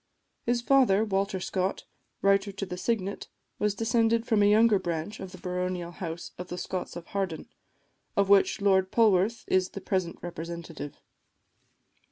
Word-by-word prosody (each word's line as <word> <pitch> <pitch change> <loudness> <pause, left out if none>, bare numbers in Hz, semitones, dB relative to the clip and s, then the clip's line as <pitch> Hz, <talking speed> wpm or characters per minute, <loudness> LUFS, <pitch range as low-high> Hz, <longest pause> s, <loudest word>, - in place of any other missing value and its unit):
His 240 0 +1
father, 240 -6 +4
Walter 195 -2 0
Scott, 185 +1 -2 0.4
Writer 195 0 +3
to 195 0 -4
the 180 - -5
Signet, 200 0 -2 0.3
was 210 -1 +1
descended 225 +1 +2
from 220 -3 +2
a 205 - +5
younger 215 -1 +5
branch 175 +3 -4
of 190 -1 -7
the 185 - -10
baronial 180 -1 -3
house 170 -1 -6
of 180 - -5
the 180 - -6
Scotts 185 -1 -4
of 170 -1 -7
Harden, 190 -2 -3 0.7
of 200 -1 +4
which 200 0 +4
Lord 190 -2 +3
Polwarth 215 0 +3
is 185 0 +2
the - - -7
present 185 -3 -1
representative. 170 -3 -7
195 Hz, 155 wpm, -28 LUFS, 180-210 Hz, 0.7 s, a